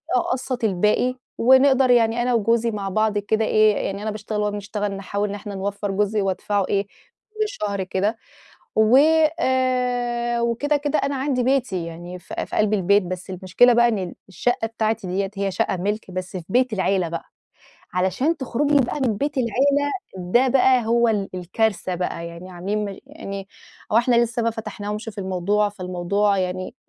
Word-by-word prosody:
أقسّط 260 -8 -1
الباقي، 210 +5 +2 0.2
ونقدَر 265 +1 +5
يعني 230 0 +3
أنا 245 0 +1
وجوزي 230 +1 +2
مع 200 -2 -3
بعض 215 +1 +1
كده 215 +2 0
إيه، 215 -1 +4
يعني 200 +1 -3
أنا 215 - -2
باشتغل 210 0 -4
وهو 210 0 0
بيشتغل، 205 0 -3
نحاول 200 +1 -3
إن 205 - -4
إحنا 205 -1 -7
نوفر 200 +1 -3
جزء 205 +1 0
وأدفعه 195 +1 0
إيه، 200 0 +1 0.5
كل 430 - -15
شهر 205 - -3
كده، 200 +4 -1 0.6
وآآ 250 -2 +2
وكده 235 +6 +1
كده 290 +1 0
أنا 280 0 -1
عندي 265 -2 0
بيتي 245 -10 0
يعني 175 +2 -8
في - - -6
في - - -6
قلب 215 0 +2
البيت، 200 +1 +3
بس 185 +1 -6
المشكلة 185 +7 +3
بقى 240 0 +5
إن 195 -6 -2
الشقة 225 +4 -1
بتاعتي 220 -2 -2
ديَّة 190 +2 -1
هي 195 0 -1
شقة 190 - 0
ملكي 205 +1 -3
بس 185 0 -5
في 175 - -6
بيت 250 +3 +2
العيلة 190 -3 +1
بقى، 165 0 -5 0.7
علشان 190 - +1
تخرُجي 285 +2 +1
بقى 290 - -4
من 240 -6 +1
بيت 285 +6 -2
العيلة 280 +5 +2 0.3
ده 190 +9 +2
بقى 255 -2 +4
هو 235 0 +3
ال 205 -3 0
الكارثة 185 +1 -1
بقى 175 -1 -3
يعني، 170 +2 -9
عامِلين 200 +4 -2
مش 200 -1 -5
يعني 200 -10 -7 0.4
هو - - +4
إحنا 240 0 +3
لسه 235 0 -3
ما 230 - +2
فاتَحناهمش 210 -1 -5
في 205 - -9
الموضوع، 195 +2 0
فالموضوع 195 +1 0
يعني 185 +4 -3
215 Hz, 170 wpm, -22 LUFS, 195-245 Hz, 0.7 s, ونقدَر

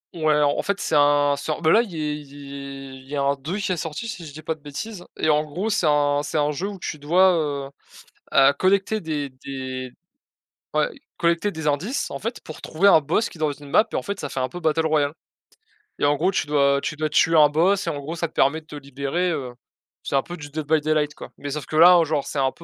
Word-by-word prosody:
Ouais, 155 -2 +2
en 145 0 +2
fait, 200 0 -2
c'est - - -3
un 145 0 +4
sort 155 +3 -4
bah, 160 - +4
là 225 - +6
il 230 -5 -6
il 140 -3 -6
il 135 - -19
y 145 - -4
a 140 - 0
un 140 - +3
2 145 +8 -5
qui 195 -2 -2
est 180 - 0
sorti 160 +6 -4
si 185 -8 -6
je - - -10
dis 155 +2 -11
pas 160 - -1
de 155 - -18
bêtises 175 +7 -7
et 155 - +1
en 150 0 +3
gros 180 +9 -3
c'est 175 -5 +1
un 145 -1 +2
c'est 150 - -3
un 150 0 +2
jeu 170 +7 -3
où 205 -1 -6
tu 155 -4 -5
dois, 180 +6 +4 0.3
heu - - -9 0.6
heu, 135 +1 +6
collecter 200 +5 +1
des 150 -4 -3
des 130 -1 -6 0.8
ouais - - +2 0.3
collecter 170 +4 +1
des 160 -3 -5
indices, 175 - -1
en - - -5
fait, 230 +3 -5
pour 155 - -10
trouver 190 +6 +3
un 160 - +7
boss 160 +10 0
qui - - -14
est - - -17
dans 155 -2 0
une 145 0 -13
map 215 - +4
en - - 0
fait 200 0 -5
ça 145 - -3
fait 135 - -3
un 130 - -1
peu 175 - -7
Battle 160 0 +1
Royale 150 -2 +1 0.9
et - - +2
en 145 0 +3
gros 175 +6 +1
tu 180 - -1
dois 140 -1 +3
tu 150 - -3
dois 155 0 -1
tuer 165 +2 +3
un 150 -2 +7
boss 185 +6 +2
et - - +2
en 145 -3 -3
gros 155 +4 -5
ça 170 -1 -2
te - - -32
permet 150 +4 +2
de - - -29
te 155 - -10
libérer. 140 +6 -2
Heu, 130 -6 -3 0.5
c'est - - -2
un 135 - +3
peu 175 0 -8
du 145 -1 -9
Dead 155 +1 -4
by 160 +1 +4
Daylight, 150 -1 0
quoi - - -10
mais 145 - -6
sauf 145 -1 -4
que 155 - -6
là 175 +2 +8
genre 150 -2 -1
c'est 145 - -3
un 135 -1 +1
peu, - - -16
150 Hz, 260 wpm, -23 LUFS, 145-170 Hz, 0.9 s, là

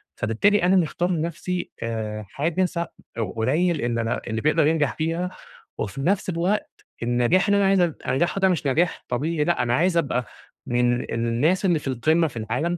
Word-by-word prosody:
فبالتالي 175 - +2
أنا 185 +2 +4
مختار 175 +1 +1
لنفسي 170 +2 -3
آآ 110 -2 -4
حاجة 170 +5 0
س 175 -1 -4 0.6
قليل 155 +8 +1
إن 120 0 -1
أنا 115 0 -1
اللي 110 0 -2
بيقدر 155 0 +3
ينجح 155 -4 +1
فيها، 165 +3 -2 0.5
وفي 120 +6 -4
نفس 190 +4 +1
الوقت 185 +5 -2 0.2
النجاح 120 - +2
اللي 200 0 +4
أنا 200 - +3
عايز 195 -1 +4
أن 170 -4 +1
أنجحه 170 +9 +1
ده 190 - +5
مش 160 -5 0
نجاح 165 +6 0
طبيعي، 150 +5 0
لأ 170 -6 +1
أنا 120 0 0
عايز 170 +3 +2
أبقى 125 -6 0 0.4
من 120 0 +2
ال - - -8
الناس 120 - +1
اللي 170 -4 +3
في 140 - -8
القمة 155 +6 +2
في 120 -6 -9
العالم، 125 +11 -1
155 Hz, 185 wpm, -24 LUFS, 120-175 Hz, 0.6 s, ده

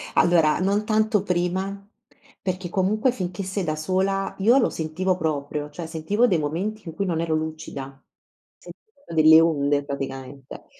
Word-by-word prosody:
Allora, 165 -3 +4
non 200 +3 +1
tanto 215 -2 +2
prima, 190 +2 -2 0.5
perché 185 -2 -3
comunque 210 +7 +1
finché 185 -4 -4
sei 190 +1 -3
da 155 -1 -1
sola 190 +4 -1
io 235 +7 +5
lo - - +2
sentivo 180 +4 -1
proprio, 150 -2 -3
cioè 165 +1 -7
sentivo 200 +10 +1
dei 180 - +2
momenti 185 +9 -3
in 165 - -7
cui 195 +4 -2
non 165 -2 -1
ero 165 -1 -1
lucida. 155 -4 -5 0.6
Sentivo 440 -11 -16
delle 160 0 +7
onde 145 -3 +1
praticamente, 135 -1 -7
175 Hz, 150 wpm, -24 LUFS, 155-195 Hz, 0.6 s, delle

